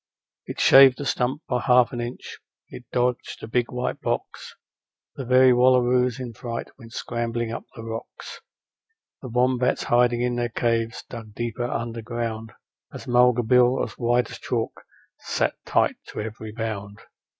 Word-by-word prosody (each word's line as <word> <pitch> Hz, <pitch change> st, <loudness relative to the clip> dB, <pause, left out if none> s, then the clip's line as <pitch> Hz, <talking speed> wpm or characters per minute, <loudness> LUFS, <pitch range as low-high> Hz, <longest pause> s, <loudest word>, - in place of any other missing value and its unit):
It -, -, -6 dB
shaved 135 Hz, -1 st, +7 dB
a 145 Hz, -, -4 dB
stump 130 Hz, +3 st, -1 dB
by 125 Hz, -1 st, 0 dB
half 125 Hz, -1 st, +4 dB
an 120 Hz, -, -3 dB
inch, 120 Hz, +1 st, -7 dB, 0.3 s
it 125 Hz, -, -10 dB
dodged 125 Hz, 0 st, -1 dB
a -, -, -5 dB
big 120 Hz, +1 st, 0 dB
white 125 Hz, 0 st, -3 dB
box: -, -, -4 dB, 0.6 s
The 135 Hz, -, -5 dB
very 130 Hz, +1 st, +6 dB
wallaroos 125 Hz, 0 st, +3 dB
in 125 Hz, -2 st, -6 dB
fright 115 Hz, +1 st, -6 dB
went 115 Hz, -2 st, -13 dB
scrambling 120 Hz, -1 st, -3 dB
up 115 Hz, -, -6 dB
the 115 Hz, -, -8 dB
rocks, 115 Hz, 0 st, -8 dB, 0.8 s
The 130 Hz, -, -7 dB
wombats 125 Hz, +1 st, +1 dB
hiding 120 Hz, 0 st, +2 dB
in 125 Hz, 0 st, -1 dB
their 120 Hz, 0 st, -1 dB
caves 115 Hz, 0 st, -1 dB
dug 110 Hz, -3 st, -10 dB
deeper 120 Hz, 0 st, -3 dB
underground, 115 Hz, -1 st, -4 dB, 0.4 s
As -, -, -9 dB
Mulga 125 Hz, 0 st, +4 dB
Bill, 125 Hz, +2 st, +4 dB
as -, -, -4 dB
white 120 Hz, 0 st, 0 dB
as -, -, -9 dB
chalk, -, -, -2 dB, 0.5 s
sat -, -, -1 dB
tight -, -, +2 dB
to -, -, -7 dB
every 110 Hz, 0 st, -6 dB
bound. 105 Hz, -2 st, -5 dB
120 Hz, 155 wpm, -24 LUFS, 115-125 Hz, 0.8 s, shaved